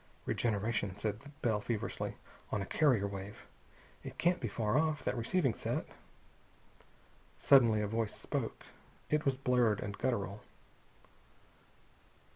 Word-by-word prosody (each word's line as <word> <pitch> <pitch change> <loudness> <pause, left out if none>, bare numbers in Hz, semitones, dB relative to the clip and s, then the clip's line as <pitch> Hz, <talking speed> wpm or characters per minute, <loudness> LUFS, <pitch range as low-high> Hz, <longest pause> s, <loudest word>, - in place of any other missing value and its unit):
"Regeneration," 105 -3 0
said 105 0 -2 0.2
Bell 110 -3 +2
feverishly, 110 -1 -3 0.4
"on 105 - 0
a 95 - -2
carrier 125 -5 +3
wave. 100 +1 -6 0.6
It - - -8
can't 175 +1 +2
be 120 - -2
far 105 +1 -1
off, 150 -2 +2
that - - 0
receiving 130 +3 +1
set." - - -2 1.5
Suddenly 115 -6 +5
a - - 0
voice 110 0 -1
spoke. - - -3 0.5
It 150 +1 +2
was 135 -2 +2
blurred 125 -5 +3
and 100 -1 -4
guttural. 105 -5 -1
115 Hz, 120 wpm, -34 LUFS, 105-130 Hz, 1.5 s, Suddenly